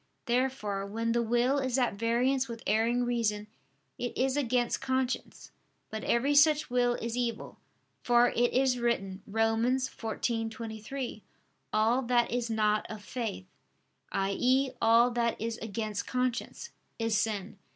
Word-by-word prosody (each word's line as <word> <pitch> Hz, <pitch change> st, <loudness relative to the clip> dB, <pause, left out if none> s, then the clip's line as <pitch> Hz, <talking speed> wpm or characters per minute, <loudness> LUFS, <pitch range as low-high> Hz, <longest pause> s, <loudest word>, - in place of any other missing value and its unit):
Therefore 235 Hz, -5 st, 0 dB
when 225 Hz, +3 st, -2 dB
the 235 Hz, 0 st, +2 dB
will 240 Hz, +4 st, +2 dB
is 260 Hz, -1 st, 0 dB
at 250 Hz, -5 st, +2 dB
variance 245 Hz, +5 st, +1 dB
with 230 Hz, -1 st, -8 dB
erring 235 Hz, +3 st, +2 dB
reason, 225 Hz, -4 st, 0 dB, 0.5 s
it 245 Hz, -, -4 dB
is 260 Hz, +1 st, +1 dB
against 245 Hz, -4 st, 0 dB
conscience. 260 Hz, -1 st, -2 dB, 0.4 s
But 220 Hz, -, -4 dB
every 260 Hz, +5 st, +2 dB
such 295 Hz, -1 st, +4 dB
will 245 Hz, -1 st, +2 dB
is 230 Hz, 0 st, -4 dB
evil; 235 Hz, -3 st, -3 dB, 0.4 s
for 240 Hz, 0 st, +4 dB
it 240 Hz, 0 st, +1 dB
is 260 Hz, -1 st, +2 dB
written 195 Hz, -5 st, -1 dB
(Rom. 225 Hz, +1 st, +1 dB
14:23): 230 Hz, -1 st, -3 dB, 0.5 s
"All 225 Hz, +4 st, +2 dB
that 240 Hz, -1 st, +1 dB
is 240 Hz, -1 st, -1 dB
not 215 Hz, -1 st, +1 dB
of 215 Hz, -1 st, -8 dB
faith" 220 Hz, -6 st, -4 dB, 0.7 s
i.e. 250 Hz, +8 st, +1 dB
all 230 Hz, +2 st, +5 dB
that 235 Hz, -1 st, 0 dB
is 225 Hz, +1 st, -3 dB
against 215 Hz, -1 st, -4 dB
conscience 255 Hz, -, -2 dB, 0.3 s
"is 225 Hz, -1 st, 0 dB
sin." 210 Hz, -2 st, -2 dB
235 Hz, 135 wpm, -30 LUFS, 220-250 Hz, 0.7 s, all